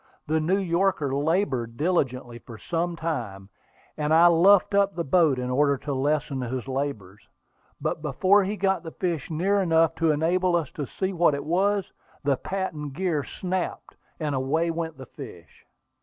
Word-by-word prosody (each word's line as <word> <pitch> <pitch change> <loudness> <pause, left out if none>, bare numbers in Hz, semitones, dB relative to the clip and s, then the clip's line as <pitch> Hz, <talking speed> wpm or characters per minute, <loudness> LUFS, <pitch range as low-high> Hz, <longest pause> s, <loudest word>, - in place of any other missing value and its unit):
The 160 +1 +1
New 175 +5 +1
Yorker 175 -6 0
labored 140 - 0
diligently 130 -7 -1
for 115 -2 -11
some 170 +6 -2
time, 115 -13 -4 0.5
and 150 0 -2
I 165 +2 +6
luffed 180 +4 +5
up 200 0 +2
the 170 - -2
boat 160 -2 +3
in 125 0 -3
order 140 +1 +2
to 145 +2 -4
lessen 140 0 -1
his 125 +1 -4
labors; 130 -8 -4 0.6
but - - -2
before 185 +8 +3
he 200 +3 -2
got 190 -2 +1
the 165 - -7
fish 170 -4 -3
near 190 +6 +1
enough 165 -2 +3
to 165 0 +2
enable 175 +4 +2
us 165 -3 -1
to 145 -3 -5
see 190 +7 -3
what 170 -4 +3
he - - -3
was, 190 +6 0 0.3
the 140 -1 +2
patent 155 -4 -4
gear 170 -3 -1
snapped, 185 +3 -4 0.2
and 150 -3 -2
away 145 +6 0
went 165 -2 -4
the 130 - -9
fish. 100 - -12
160 Hz, 170 wpm, -25 LUFS, 135-180 Hz, 0.6 s, I